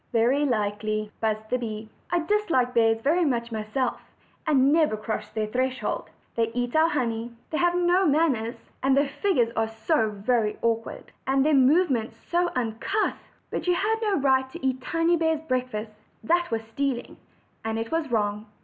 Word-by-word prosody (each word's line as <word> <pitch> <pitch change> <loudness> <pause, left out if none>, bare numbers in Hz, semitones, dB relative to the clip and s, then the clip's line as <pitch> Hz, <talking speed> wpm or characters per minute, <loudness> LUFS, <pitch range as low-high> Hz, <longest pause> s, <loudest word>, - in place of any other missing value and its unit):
"Very 250 +5 +3
likely," 215 -2 -1
buzzed 215 -1 -1
the 250 - +2
bee; 220 -2 -5 0.2
"I 350 -1 +1
dislike 330 -11 +1
bears 225 -1 +3
very 325 +8 +2
much 235 -6 0
myself, 225 +4 -2 0.5
and 275 -2 +4
never 310 -9 +3
cross 215 0 -4
their 215 -1 -2
threshold. 255 +4 -2 0.3
They 230 -1 +2
eat 245 +1 -1
our 320 +1 +5
honey, 235 -5 -2 0.2
and 315 - 0
have 350 0 +3
no 355 +1 +3
manners; 275 -7 0
and 270 0 +3
then 280 - +5
their 275 - -8
figures 260 - +2
are 225 0 +1
so 225 +2 0
very 210 +1 0
awkward, 230 -1 -2 0.2
and 270 +1 +3
their 310 - +3
movements 270 -3 +3
so 350 0 0
uncouth! 250 - -1 0.2
But - - -3
you 355 - +4
had 435 +4 +1
no 420 -3 +1
right 265 -2 +2
to 265 - -7
eat 260 -1 0
Tiny 330 +5 +1
bear's 320 -1 +1
breakfast 250 -6 -2 0.3
that 345 +1 +2
was 225 -2 -2
stealing, 245 +2 -3 0.5
and 225 0 -2
it 225 0 -4
was 325 -3 -1
wrong. 210 -1 0
255 Hz, 175 wpm, -26 LUFS, 225-315 Hz, 0.5 s, our